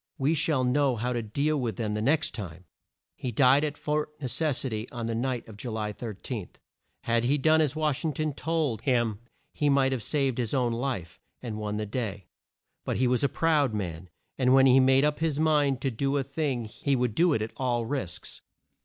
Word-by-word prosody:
We 140 +4 +2
shall 150 -3 +1
know 130 +1 +2
how 125 +3 -2
to 120 - -1
deal 140 +8 0
with 115 -5 -2
them 105 +1 -2
the 105 - -2
next 150 +6 +2
time!" 90 -5 -7 0.5
He 125 - -4
died 135 +5 +5
at 150 -1 -2
Fort 150 0 -1
Ne 145 - -5
ces 150 +1 0
si 135 - -2
ty 110 0 -4
on 120 -2 -4
the 115 - -2
night 120 +1 -2
of 110 -2 -11
Ju 120 - -6
ly 105 -1 -3
13. 110 -2 -6 0.5
Had 115 0 +1
he 140 +4 +3
done 155 +3 +4
as 150 -2 +1
Wash 155 -3 0
ing 160 - 0
ton 155 +1 -2
told 150 -7 -1
him 120 -6 +1 0.3
he 145 - +1
might 135 -1 +3
have 130 -3 -1
saved 135 0 0
his 120 +1 -1
own 125 -3 +1
life, 115 -8 -3 0.2
and 110 -4 -5
won 105 -1 -3
the 105 - -2
day. 105 -4 -4 0.6
But - - -2
he 130 - +2
was 125 +2 +1
a 140 - +3
proud 150 -8 +2
man, 90 -3 -4 0.3
and 130 0 +4
when 135 0 +6
he 130 0 +6
made 135 +2 +5
up 150 0 0
his 160 -3 0
mind 145 -4 +2
to 135 - 0
do 135 +4 0
a 140 - 0
thing 135 -3 -2
he 135 +6 -1
would 125 -3 0
do 170 +5 +3
it 110 - 0
at 110 - -6
all 120 -3 -1
risks. 115 -9 -5
130 Hz, 225 wpm, -27 LUFS, 115-145 Hz, 0.6 s, when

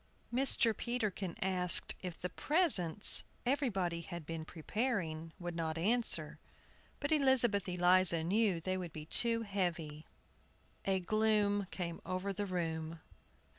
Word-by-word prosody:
Mr. 245 -3 +4
Peterkin 215 -7 -3
asked 180 -2 +4
if 180 -3 -6
the 180 - -3
presents 210 - +3 0.2
everybody 195 - -1
had 170 -1 -8
been 165 0 -6
preparing 165 -2 -3
would 175 -1 -6
not 160 -1 -3
answer. 225 +8 0 0.6
But 285 +1 -3
Elizabeth 250 -10 +2
Eliza 180 -1 +3
knew 195 0 +1
they 185 +3 -3
would 175 -3 -7
be 155 -1 -8
too 230 +7 +3
heavy. 170 -7 -4 0.8
A 195 -1 +1
gloom 205 0 +1
came 170 -2 -6
over 185 +2 -4
the 205 +1 -4
room. 165 -3 -4
185 Hz, 125 wpm, -34 LUFS, 170-220 Hz, 0.8 s, Mr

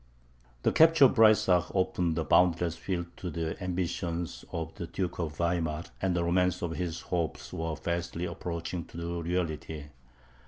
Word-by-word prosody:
The - - +3
capture 160 -2 +7
of 130 - +5
Breysach 105 -6 +5
opened 90 -3 +1
a 80 - +1
boundless 85 0 +3
field 85 -2 -4
to 90 - -4
the 80 +1 -3
ambition 85 -1 -2 0.2
of 80 -1 -4
the 85 - -6
Duke 90 -1 -3
of 75 -3 -3
Weimar, 85 -2 0 0.2
and 95 -2 +1
the 85 - +1
romance 90 +1 +1
of 85 - -1
his 85 -1 -3
hopes 85 -3 -3
was 80 -1 -3
fast 85 +1 -3
approaching 85 0 -4
to 85 0 -5
reality. 80 -3 -2
85 Hz, 155 wpm, -30 LUFS, 85-90 Hz, 0.2 s, capture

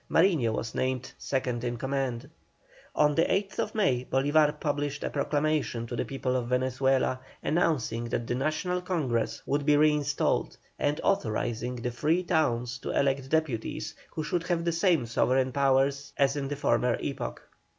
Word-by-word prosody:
Mariño 165 - +3
was 115 +1 -3
named 130 0 -2
second 125 -3 -2
in 120 -1 -2
command. 135 -1 -2 0.7
On 150 0 +4
the 165 - +3
8th 195 +2 -1
May 130 - +2
Bolívar 150 +3 +2
published 145 -1 -2
a - - -2
proclamation 145 -4 0
to 120 - -5
the - - -1
people 130 -1 -2
of 125 -2 -1
Venezuela, 130 +1 +1 0.2
announcing 135 -9 0
that 115 0 -2
the 120 - -2
National 155 +7 -1
Congress 140 - -1
would 145 +1 0
be 145 0 +4
reinstalled, 150 -1 +1 0.2
and 145 +1 0
authorising 120 - 0
the 120 0 -3
free 155 +9 +1
towns 125 -9 0
to - - -1
elect 135 -1 0
deputies, 155 -8 -1 0.2
who 155 - -4
should 170 +3 -1
have 170 -2 0
the 170 - +2
same 170 -5 +2
sovereign 130 +3 +1
powers 140 +1 +1
as 140 0 +3
in 140 -2 -2
the 145 - -3
former 125 -3 +1
epoch. 140 - -4
135 Hz, 160 wpm, -28 LUFS, 125-155 Hz, 0.7 s, On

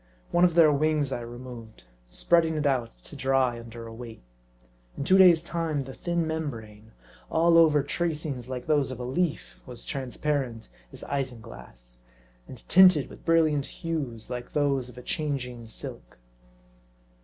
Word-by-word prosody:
One 175 - +3
of 175 -2 +4
their 165 -3 +7
wings 150 -1 +1
I 120 - -3
removed, 120 - -10 0.2
spreading 160 - +2
it 150 -1 -1
out 130 -5 +1
to - - -14
dry 130 -3 +1
under 115 0 -9
a 115 - -9
weight. 115 - -10 0.7
In - - -3
two 185 +6 +4
days' 175 -3 +7
time 165 -4 -2
the 135 0 -8
thin 170 +2 -2
mem 160 -1 -2
brane, 110 -3 -11 0.4
all 165 +1 +3
over 155 -4 +5
tracings 150 -5 -3
like 125 -1 -5
those 150 -4 +2
of 130 -2 -6
a - - -4
leaf, 125 - -2
was - - -8
transparent 130 - -3 0.2
as - - -10
isinglass, 60 - -6 0.5
and - - -12
tinted 180 -5 +6
with - - -14
brilliant 155 -4 +2
hues, 140 -9 -5
like 125 0 -6
those 140 -4 0
of 125 - -15
a 125 - -9
changing 125 -7 -3
silk. - - -9
135 Hz, 155 wpm, -27 LUFS, 120-160 Hz, 0.7 s, their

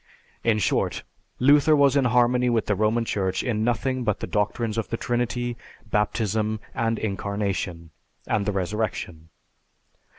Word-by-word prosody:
In 115 -2 +3
short, 105 - 0 0.3
Luther 145 +3 +5
was 140 -2 +4
in 140 -2 +3
harmony 125 +1 +3
with 115 -2 +1
the 105 - +1
Roman 110 +3 +1
Church 95 -4 -1
in 110 -4 -1
nothing 125 +2 0
but 105 -3 0
the - - -3
doctrines 105 +2 -1
of 115 - -3
the 115 - -2
Trinity, 120 0 -2 0.3
Baptism, 105 +1 0
the 115 -3 -1
Incarnation, 100 -5 -3 0.3
and 105 -2 0
the - - +2
Resurrection. 95 -4 -3
110 Hz, 140 wpm, -25 LUFS, 105-120 Hz, 0.3 s, Luther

